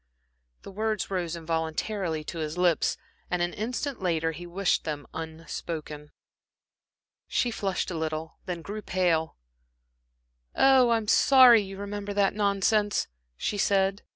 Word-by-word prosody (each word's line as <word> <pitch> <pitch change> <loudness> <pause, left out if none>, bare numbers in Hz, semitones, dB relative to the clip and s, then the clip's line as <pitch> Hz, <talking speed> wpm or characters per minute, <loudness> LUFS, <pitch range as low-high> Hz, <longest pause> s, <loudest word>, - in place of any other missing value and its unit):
The - - -9
words 215 -1 -2
rose 175 -3 -2
involuntarily 165 +1 -2
to 165 - -6
his 155 +1 -4
lips, 175 -3 +2 0.3
and 180 - 0
an 175 - -2
instant 245 +3 -3
later 165 -3 0
he 175 +2 -9
wished 185 +2 0
them 150 -2 -4
unspoken. 160 -2 -6 1.2
She 245 - 0
flushed 195 -4 -2
a - - -4
little, 160 0 -4
then 175 -2 -4
grew 210 +4 -6
pale. 175 -5 0 1.2
"Oh, 265 -2 +5
I'm 225 -2 +1
sorry 255 -2 +7
you 195 -1 -8
remembered 205 0 -5
that 200 -1 +3
nonsense," 205 0 +1 0.3
she 205 - -2
said. 195 0 +2
185 Hz, 130 wpm, -27 LUFS, 165-205 Hz, 1.2 s, sorry